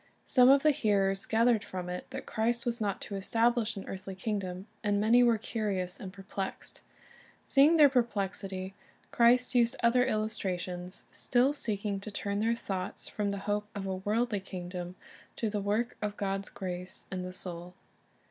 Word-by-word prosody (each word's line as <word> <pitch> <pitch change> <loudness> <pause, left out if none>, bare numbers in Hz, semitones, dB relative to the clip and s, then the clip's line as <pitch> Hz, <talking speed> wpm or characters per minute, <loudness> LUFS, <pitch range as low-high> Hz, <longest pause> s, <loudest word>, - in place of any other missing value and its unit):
Some 250 -1 +6
of 275 0 +6
the 305 - +6
hearers 195 -6 +1
gathered 230 -1 +3
from 180 -1 -6
it 180 0 -5
that - - -6
Christ 235 +2 0
was 235 -1 0
not 200 -2 -1
to - - -6
estabhsh 225 +3 +1
an 195 - -7
earthly 190 0 -6
kingdom, 190 -2 -3 0.2
and 205 -1 +2
many 225 +4 +5
were 235 -2 +5
curious 200 -5 -2
and 190 - -7
perplexed. 195 0 -6 0.6
Seeing 295 +5 +5
their 300 -2 +9
perplexity, 195 -6 -1 0.4
Christ 245 +2 +4
used 240 -2 +3
other 240 +2 +5
illustrations, 185 -5 -2
still 255 +3 +2
seeking 205 -6 -1
to 205 - -7
turn 200 0 -2
their 225 +2 +2
thoughts 190 -4 -4
from 205 -1 -2
the 200 - -2
hope 210 0 -1
of 200 -1 -4
a 190 -1 -2
worldly 210 +3 0
kingdom 180 -1 -6 0.4
to 220 -2 -2
the 205 -1 -1
work 215 +5 0
of 210 -1 -3
God's 195 0 -2
grace 180 -1 -6
in 185 -1 -3
the 180 0 -5
soul. 180 -1 -5
205 Hz, 165 wpm, -30 LUFS, 190-235 Hz, 0.6 s, their